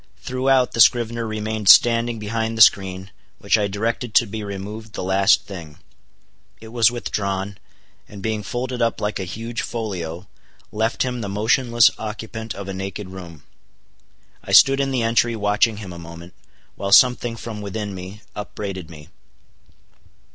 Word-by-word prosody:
Throughout, 130 0 +1
the 115 - +2
scrivener 115 0 +3
remained 110 -1 -2
standing 115 0 +6
behind 110 +1 -3
the 115 - +9
screen, 95 -1 +2 0.3
which - - +1
I 105 -2 +1
directed 110 +3 -3
to 120 - +6
be 110 0 -6
removed 105 +2 -7
the - - -5
last 95 +2 +3
thing. 80 -6 -10 0.8
It 110 - -12
was 115 -1 +4
withdrawn; 100 -4 -3 0.5
and 105 - -10
being 110 -1 -2
folded 125 +3 -4
up 115 -1 0
like 105 0 -2
a 95 - -3
huge 115 +5 -5
folio, 95 -6 -5 0.4
left 110 +2 0
him 125 -2 -3
the 100 - -4
motionless 115 +3 +3
occupant 110 +1 -6
of 100 -1 -7
a 95 - -4
naked 95 +1 -6
room. 85 -5 -11 1.0
I - - -5
stood 135 0 +7
in 135 0 0
the 130 -3 0
entry 115 +1 +2
watching 105 +1 +1
him 95 -4 -8
a 85 - -9
moment, 85 +1 -11 0.4
while 100 0 -5
something 120 +1 +5
from 110 -2 -7
within 100 0 -5
me 95 +3 -9
upbraided 100 -4 -6
me. 75 -2 -13
105 Hz, 155 wpm, -21 LUFS, 95-115 Hz, 1.0 s, the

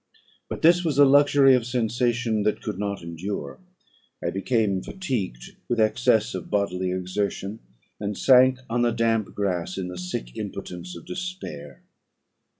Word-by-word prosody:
"But - - -6
this 175 +2 +6
was 155 -5 -1
a 145 - +8
luxury 140 -1 +6
of 125 -2 +3
sensation 120 -2 0
that 105 +1 0
could 90 - -4
not 100 -3 -3
endure; 85 +5 -5 0.7
I - - 0
became 100 -1 0
fatigued 110 - -4 0.2
with 120 - 0
excess 110 0 +2
of 95 -2 -6
bodily 95 -3 0
exertion, 95 +3 -3 0.4
and 105 -1 -3
sank 130 0 +6
on 120 +1 0
the 120 - +3
damp 115 -2 0
grass 90 -3 -2
in 90 -2 -3
the 90 0 -7
sick - - -5
impotence 90 0 -6
of 85 - -12
despair. 175 - -7
105 Hz, 150 wpm, -25 LUFS, 90-125 Hz, 0.7 s, a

